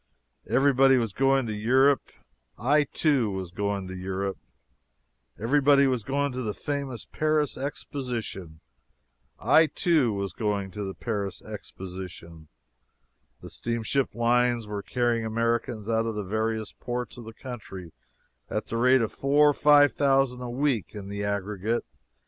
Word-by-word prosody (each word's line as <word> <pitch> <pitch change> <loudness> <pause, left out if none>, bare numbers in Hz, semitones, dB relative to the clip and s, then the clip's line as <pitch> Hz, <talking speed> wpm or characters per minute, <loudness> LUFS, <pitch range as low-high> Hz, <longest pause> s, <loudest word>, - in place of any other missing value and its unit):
Everybody 135 -1 +5
was 115 -5 -1
going 135 +1 +2
to 110 - -3
Europe 130 +6 +3 0.5
I, 145 +5 +3
too, 140 -6 +1
was 95 -3 -5
going 100 0 -2
to 95 - -7
Europe. 95 +1 -3 1.0
Everybody 140 +4 +4
was 130 -3 +1
going 140 +5 -1
to 130 0 -4
the 105 -4 -3
famous 140 -5 -4
Paris 155 -2 0
Exposition 120 - -5 0.8
I, 160 0 +5
too, 155 - +2
was 100 -3 -3
going 100 -3 -2
to 105 +3 -5
the 95 -1 -5
Paris 100 -5 -4
Exposition. 90 -5 -9 0.9
The - - -9
steamship 120 +2 -2
lines 120 0 +2
were 105 -1 -4
carrying 120 0 0
Americans 115 -1 -1
out 115 0 +1
of 115 - -3
the 105 - -3
various 110 +2 -2
ports 125 +1 -5
of 120 - -10
the 110 - -9
country 105 - -9 0.6
at - - -2
the 115 - -2
rate 125 +2 +5
of 110 - -2
four 145 +2 +4
or - - -3
five 145 0 +5
thousand 135 -3 +2
a 125 - -5
week 120 -4 -1
in 100 -1 -7
the 100 0 -4
aggregate. 100 +2 -2
115 Hz, 145 wpm, -27 LUFS, 100-135 Hz, 1.0 s, Everybody